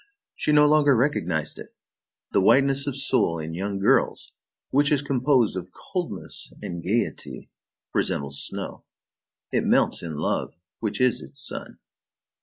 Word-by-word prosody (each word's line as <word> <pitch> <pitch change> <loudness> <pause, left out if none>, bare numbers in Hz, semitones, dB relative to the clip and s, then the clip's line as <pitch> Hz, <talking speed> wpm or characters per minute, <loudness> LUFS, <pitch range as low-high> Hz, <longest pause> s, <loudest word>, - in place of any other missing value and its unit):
She 150 - -1
no 150 0 +6
longer 145 -2 +5
recognized 90 - 0
it. - - -11 0.6
The - - +3
whiteness 140 +6 +4
of 140 - -2
soul 125 -11 +1
in 80 0 -5
young 100 +3 -3
girls, 95 - +1 0.4
which 145 +2 +3
is 145 -1 +2
composed 130 -5 +2
of 90 0 -6
coldness 175 - -5
and 85 -1 -6
gayety, 110 +7 -2 0.4
resembles 70 0 -1
snow. - - -5 0.7
It - - +2
melts - - +2
in 80 -3 -5
love, 80 - -2 0.2
which 110 -3 -2
is 125 -2 +3
its 140 - -5
sun. - - -5
120 Hz, 140 wpm, -25 LUFS, 85-140 Hz, 0.7 s, no